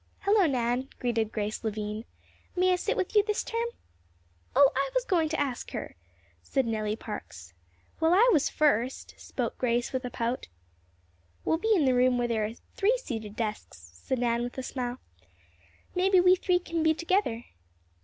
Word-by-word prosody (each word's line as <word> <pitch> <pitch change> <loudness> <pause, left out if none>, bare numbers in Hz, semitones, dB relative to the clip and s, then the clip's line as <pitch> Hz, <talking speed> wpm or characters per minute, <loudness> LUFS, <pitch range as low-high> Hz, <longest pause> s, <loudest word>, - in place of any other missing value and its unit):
"Hello, 400 -2 +4
Nan," 250 0 0
greeted 230 -3 0
Grace 210 +1 -3
Lavine. 215 0 -3 0.5
"May 365 0 +3
I - - +4
sit 360 - -1
with 375 - -2
you 415 - +7
this 425 0 -1
term?" 460 +1 -2 0.9
"Oh, 280 0 +7
I 275 +1 +1
was - - +1
going 335 -7 +2
to 320 - -2
ask 270 -4 -2
her," - - -5 0.5
said 270 -2 0
Nellie 215 -2 -1
Parks. 85 - -8 0.5
"Well, 320 0 +3
I 450 +6 +6
was 295 - +3
first," 265 -4 +1
spoke - - -4
Grace, 240 0 0
with 260 0 -1
a 250 - -3
pout. 235 +1 -2 1.0
"We'll 320 - +2
be 445 +4 0
in 320 -7 +3
the 260 - +4
room 250 0 +3
where 240 0 +1
there 220 -2 0
are 220 +2 -5 0.2
three 440 +5 +3
seated 220 - -6
desks," 215 -2 -4 0.2
said 260 - -3
Nan 235 -1 +1
with 245 +2 -5
a 260 - -3
smile. 250 -1 -3 1.0
"Maybe 375 +1 +4
we 365 +1 +6
three 360 -1 +2
can 335 -2 -3
be 315 0 +3
together." 335 - 0
260 Hz, 175 wpm, -28 LUFS, 230-355 Hz, 1.0 s, you